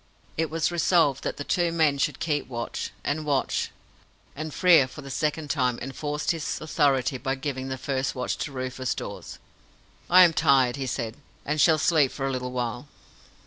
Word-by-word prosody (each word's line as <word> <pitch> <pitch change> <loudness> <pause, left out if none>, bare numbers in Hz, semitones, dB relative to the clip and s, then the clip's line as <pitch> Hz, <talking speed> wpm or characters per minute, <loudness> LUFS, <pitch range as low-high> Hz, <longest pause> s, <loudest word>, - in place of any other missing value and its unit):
It 160 0 -1
was 160 +1 0
resolved 165 -5 +2
that - - -3
the 145 - -4
two 175 +2 +1
men 155 -4 +2
should - - 0
keep 150 -3 -1
watch 120 -2 -4
and 155 +2 -1
watch; 145 -3 0 0.7
and 155 +2 -5
Frere 170 -7 +5
for 130 - -11
the 135 - -8
second 150 +2 -1
time 125 -4 +1
enforced 145 +4 -2
his 160 -3 -3
authority 140 -4 +1
by 135 0 -1
giving 135 -1 -4
the 130 0 -4
first 135 +1 -2
watch 125 -1 -2
to 150 - -3
Rufus 130 -1 -3
Dawes. - - -7 0.7
"I 185 +1 +9
am 170 -2 +5
tired," 130 -5 +3
he 135 -2 -4
said, 115 -3 -3 0.3
"and 150 +1 0
shall 160 -2 +5
sleep 155 -3 +3
for 135 - -4
a 135 - 0
little 125 -1 -3
while." 125 +2 -3
140 Hz, 185 wpm, -26 LUFS, 130-155 Hz, 0.7 s, I